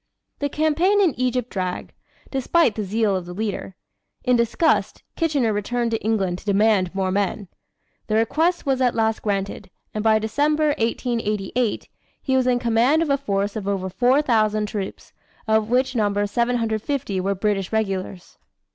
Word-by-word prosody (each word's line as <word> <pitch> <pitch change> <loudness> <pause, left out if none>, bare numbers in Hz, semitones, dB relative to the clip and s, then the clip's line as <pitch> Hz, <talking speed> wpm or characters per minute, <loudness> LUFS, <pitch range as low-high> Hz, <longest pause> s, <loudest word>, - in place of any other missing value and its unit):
The 285 - -1
campaign 320 +8 +2
in 365 -8 +3
Egypt 250 -1 -1
dragged, 185 -2 -3 0.4
despite 270 0 +2
the 215 - -3
zeal 205 0 +1
of 180 -2 -4
the 175 - -7
leader. 205 -2 -4 0.5
In 250 -2 +3
disgust, 235 +8 +1
Kitchener 285 -9 +1
returned 235 +3 -1
to 225 - -1
England 195 -5 0
to - - -17
demand 200 -2 +2
more 190 -1 0
men. 200 0 -1 0.6
The 215 - 0
request 320 +12 +1
was 265 -2 +1
at 250 -2 +2
last 220 -1 +1
granted, 200 -2 -3 0.2
and 215 - -3
by 220 -1 +4
December, 295 +8 +1
1888, 230 -1 -1 0.3
he 265 - -1
was 260 -1 +2
in 250 -1 +3
command 245 +6 +2
of 300 - -1
a - - +4
force 200 -7 -2
of 205 -3 -4
over 190 -2 -1
4,000 225 -2 +2
troops, 205 -2 -6 0.3
of 220 0 +2
which 255 +2 +1
number 205 -2 +1
750 230 0 -1
were 195 +2 -1
British 195 -1 -1
regulars! 195 -4 -3
220 Hz, 155 wpm, -22 LUFS, 200-255 Hz, 0.6 s, by